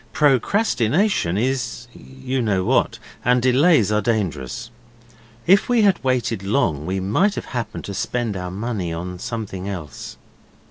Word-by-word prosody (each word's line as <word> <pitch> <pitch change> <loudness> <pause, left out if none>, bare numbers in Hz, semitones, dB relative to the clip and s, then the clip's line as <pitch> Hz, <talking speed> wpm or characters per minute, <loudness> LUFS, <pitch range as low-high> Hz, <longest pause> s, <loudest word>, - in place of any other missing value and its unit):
Procrastination 140 - +2
is 120 0 -1
you 130 -1 -4
know 100 -5 +1
what - - +1 0.3
and 125 +1 +4
delays 130 - +4
are 105 0 +2
dangerous. 110 - -2 0.7
If 195 +6 +4
we 240 -3 +4
had 195 -7 +3
waited 125 -5 0
long 95 - 0
we 95 +1 -1
might 150 - +1
have - - -5
happened 115 -3 -4
to 100 - -5
spend 115 +1 -2
our 90 -1 -4
money 100 -2 -3
on 90 +2 -5
something 100 -4 -5
else. 85 -7 -7
115 Hz, 140 wpm, -21 LUFS, 95-130 Hz, 0.7 s, and